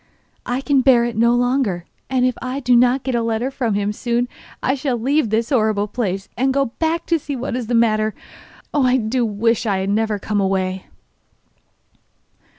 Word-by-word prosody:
'I 245 Hz, +2 st, -1 dB
can 275 Hz, -1 st, +2 dB
bear 245 Hz, -2 st, +5 dB
it 240 Hz, -, -3 dB
no 235 Hz, +2 st, +3 dB
longer, 245 Hz, -8 st, 0 dB, 0.2 s
and 255 Hz, -1 st, +2 dB
if 255 Hz, -, +2 dB
I 255 Hz, +2 st, -3 dB
do 250 Hz, -2 st, +3 dB
not 245 Hz, +2 st, +3 dB
get 260 Hz, -, -2 dB
a 235 Hz, -, +1 dB
letter 230 Hz, +3 st, -1 dB
from 235 Hz, -6 st, -1 dB
him 205 Hz, +1 st, -1 dB
soon 240 Hz, +2 st, -1 dB, 0.4 s
I 265 Hz, -, +2 dB
shall 265 Hz, -2 st, -1 dB
leave 275 Hz, +2 st, +1 dB
this 225 Hz, +4 st, 0 dB
horrible 215 Hz, -5 st, +2 dB
place 200 Hz, -3 st, -3 dB
and 265 Hz, +2 st, +1 dB
go 275 Hz, 0 st, +3 dB
back 330 Hz, +1 st, 0 dB
to 335 Hz, -1 st, +1 dB
see 285 Hz, -1 st, -5 dB
what 250 Hz, -1 st, -3 dB
is 250 Hz, -3 st, -3 dB
the 240 Hz, -, 0 dB
matter. 215 Hz, -2 st, +2 dB, 0.6 s
Oh! 290 Hz, -, +2 dB
I 255 Hz, 0 st, +4 dB
do 240 Hz, +1 st, 0 dB
wish 230 Hz, +2 st, 0 dB
I 200 Hz, -2 st, +1 dB
had 190 Hz, +1 st, -1 dB
never 215 Hz, 0 st, 0 dB
come 205 Hz, 0 st, -1 dB
away! 190 Hz, -1 st, -1 dB
235 Hz, 195 wpm, -20 LUFS, 215-260 Hz, 0.6 s, bear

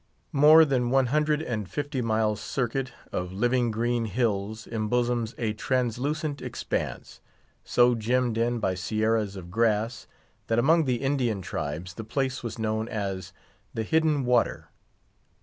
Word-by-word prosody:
More 155 Hz, +3 st, +8 dB
than 125 Hz, -4 st, +1 dB
one 135 Hz, +1 st, +3 dB
hundred 150 Hz, 0 st, +2 dB
and 105 Hz, -, -3 dB
fifty 145 Hz, -2 st, -3 dB
miles' 110 Hz, -2 st, 0 dB
circuit 130 Hz, +1 st, -2 dB, 0.2 s
of 90 Hz, 0 st, -3 dB
living 120 Hz, +5 st, +1 dB
green 115 Hz, +1 st, 0 dB
hills 110 Hz, -1 st, -1 dB
embosoms 120 Hz, +1 st, -1 dB
a 110 Hz, -2 st, -1 dB
translucent 130 Hz, +6 st, -1 dB
expanse, -, -, -4 dB, 0.4 s
so 120 Hz, 0 st, +4 dB
gemmed 120 Hz, +1 st, 0 dB
in 120 Hz, +1 st, +1 dB
by 95 Hz, -5 st, 0 dB
sierras 110 Hz, +2 st, 0 dB
of 90 Hz, -2 st, -9 dB
grass, 115 Hz, +3 st, 0 dB, 0.4 s
that 115 Hz, -, +1 dB
among 160 Hz, +7 st, +4 dB
the 125 Hz, -1 st, -1 dB
Indian 125 Hz, -8 st, 0 dB
tribes 85 Hz, +3 st, -4 dB
the 110 Hz, -, -7 dB
place 130 Hz, +3 st, -2 dB
was 120 Hz, -1 st, -5 dB
known 110 Hz, 0 st, -1 dB
as 100 Hz, -4 st, -4 dB, 0.4 s
"The 110 Hz, -, -1 dB
Hidden 155 Hz, +1 st, +2 dB
Water." 120 Hz, -1 st, +1 dB
120 Hz, 140 wpm, -27 LUFS, 110-130 Hz, 0.4 s, More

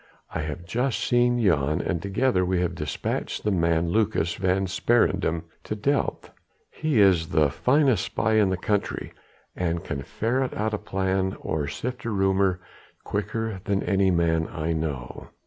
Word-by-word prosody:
I 80 Hz, -, -2 dB
have 80 Hz, +3 st, -5 dB
just 125 Hz, +7 st, -1 dB
seen 120 Hz, 0 st, +3 dB
Jan, 75 Hz, -8 st, +2 dB
and 85 Hz, -3 st, -2 dB
together 100 Hz, 0 st, +1 dB
we 90 Hz, 0 st, +1 dB
have 90 Hz, -1 st, 0 dB
despatched 75 Hz, -4 st, -3 dB
the 105 Hz, -, +1 dB
man 85 Hz, -2 st, +1 dB
Lucas 105 Hz, -4 st, +1 dB
van 95 Hz, +1 st, +1 dB
Sparendam 95 Hz, -4 st, +1 dB, 0.2 s
to 105 Hz, -, -3 dB
Delft. 140 Hz, +7 st, -1 dB, 0.4 s
He 155 Hz, -7 st, 0 dB
is 90 Hz, -5 st, +5 dB
the 75 Hz, -2 st, +2 dB
finest 130 Hz, -, +2 dB
spy 110 Hz, -, 0 dB
in 105 Hz, -3 st, +4 dB
the 95 Hz, -, 0 dB
country, 105 Hz, +2 st, -2 dB, 0.4 s
and 85 Hz, -2 st, -1 dB
can -, -, -4 dB
ferret 130 Hz, +4 st, -1 dB
out 110 Hz, +1 st, -1 dB
a 105 Hz, -, -1 dB
plan 95 Hz, 0 st, -1 dB
or 75 Hz, -2 st, -2 dB
sift 125 Hz, -, -5 dB
a -, -, -1 dB
rumour 95 Hz, -2 st, +2 dB, 0.4 s
quicker 105 Hz, 0 st, -3 dB
than 100 Hz, -1 st, 0 dB
any 95 Hz, -1 st, +2 dB
man 80 Hz, -2 st, +2 dB
I 80 Hz, 0 st, -2 dB
know. 75 Hz, -6 st, -4 dB
95 Hz, 160 wpm, -25 LUFS, 85-110 Hz, 0.4 s, is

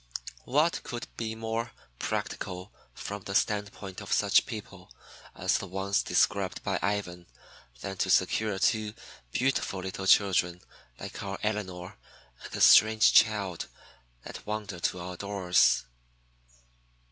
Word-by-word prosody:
What 150 Hz, +6 st, +2 dB
could 120 Hz, -1 st, -6 dB
be 110 Hz, -1 st, -4 dB
more 115 Hz, +1 st, -3 dB, 0.3 s
practical 90 Hz, +2 st, -4 dB, 0.2 s
from 100 Hz, 0 st, -6 dB
the 100 Hz, +1 st, -6 dB
standpoint 105 Hz, -3 st, -1 dB
of -, -, -9 dB
such -, -, +4 dB
people -, -, -8 dB, 0.4 s
as 95 Hz, +1 st, +1 dB
the 100 Hz, -, -6 dB
ones 95 Hz, +2 st, 0 dB
described -, -, +1 dB
by -, -, -1 dB
Ivan 90 Hz, -3 st, -2 dB, 0.5 s
than 95 Hz, -1 st, -5 dB
to 95 Hz, -, 0 dB
secure 100 Hz, +3 st, +2 dB
two 110 Hz, +2 st, +1 dB, 0.4 s
beautiful 125 Hz, -, 0 dB
little 95 Hz, +1 st, -5 dB
children 90 Hz, -3 st, +4 dB, 0.4 s
like -, -, -7 dB
our 100 Hz, 0 st, -4 dB
Elinor 95 Hz, -4 st, -3 dB, 0.4 s
and -, -, -9 dB
the -, -, -4 dB
strange 110 Hz, 0 st, +7 dB
child 105 Hz, -6 st, +3 dB, 0.6 s
that -, -, -9 dB
wandered 105 Hz, -4 st, -5 dB
to 90 Hz, -, 0 dB
our 90 Hz, +1 st, -6 dB
doors? 90 Hz, -11 st, +2 dB
100 Hz, 125 wpm, -29 LUFS, 90-110 Hz, 0.6 s, strange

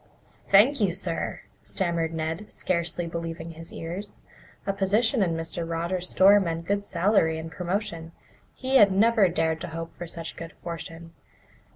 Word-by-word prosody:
"Thank 230 Hz, +7 st, +5 dB
you, 195 Hz, -3 st, +3 dB
sir," 170 Hz, -2 st, -2 dB, 0.2 s
stammered 170 Hz, -4 st, -1 dB
Ned, 160 Hz, +5 st, -4 dB
scarcely 170 Hz, -1 st, -1 dB
believing 165 Hz, 0 st, -5 dB
his 165 Hz, 0 st, -10 dB
ears. 180 Hz, +5 st, -6 dB, 0.5 s
A 195 Hz, -, 0 dB
position 215 Hz, +5 st, +2 dB
in 170 Hz, -4 st, +1 dB
Mr. 165 Hz, +1 st, -3 dB
Rogers's 170 Hz, +2 st, -1 dB
store 200 Hz, +2 st, +6 dB
meant 165 Hz, -3 st, -2 dB
good 200 Hz, +2 st, 0 dB
salary 170 Hz, -4 st, +2 dB
and 160 Hz, 0 st, -6 dB
promotion. 175 Hz, -2 st, -3 dB, 0.4 s
He 265 Hz, +1 st, +2 dB
had 205 Hz, -5 st, +7 dB
never 210 Hz, 0 st, +4 dB
dared 160 Hz, -1 st, 0 dB
to -, -, -4 dB
hope 165 Hz, 0 st, -6 dB
for 175 Hz, -, -7 dB
such 165 Hz, -1 st, -5 dB
good 165 Hz, 0 st, -8 dB
fortune. 165 Hz, 0 st, -8 dB
170 Hz, 155 wpm, -26 LUFS, 165-200 Hz, 0.5 s, had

